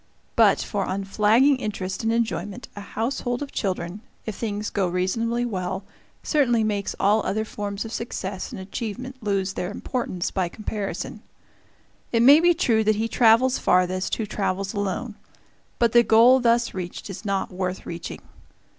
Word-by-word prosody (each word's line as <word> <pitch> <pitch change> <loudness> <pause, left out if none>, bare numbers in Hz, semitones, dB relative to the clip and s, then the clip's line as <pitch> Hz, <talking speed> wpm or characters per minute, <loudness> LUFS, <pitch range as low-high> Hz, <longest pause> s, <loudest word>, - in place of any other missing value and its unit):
But - - +5
for - - -2
unflagging 210 +8 +3
interest 200 -6 -4
and 225 - +1
enjoyment, 230 0 -2
a 205 - -7
household 245 +4 -2
of 280 - -8
children, 185 -1 -3 0.2
if 220 - -3
things 210 -1 -3
go 195 -3 +1
reasonably 230 +7 0
well, 190 -3 -3 0.4
certainly 240 -7 +2
makes 205 -2 -1
all 210 +3 +3
other 220 +2 -1
forms 205 0 -4
of 225 - -7
success 195 -4 -4
and - - -7
achievement 235 +6 -6
lose 195 -2 -1
their 180 - -3
importance 205 -4 -3
by 185 -3 -1
comparison. 210 0 -5 0.9
It 230 -1 +3
may 280 +5 +9
be 345 +1 +4
true 230 -9 +2
that 215 0 +3
he 220 +2 0
travels 240 +2 +4
farthest 185 +1 +2
who 220 - -3
travels 195 -1 -2
alone; 205 +2 -3 0.6
but 235 -2 +3
the 240 - +7
goal 235 +3 +6
thus 235 -1 +2
reached 180 -2 -6
is 195 - -8
not 200 -2 -1
worth 185 0 -3
reaching. 170 0 -7
215 Hz, 155 wpm, -24 LUFS, 190-235 Hz, 0.9 s, may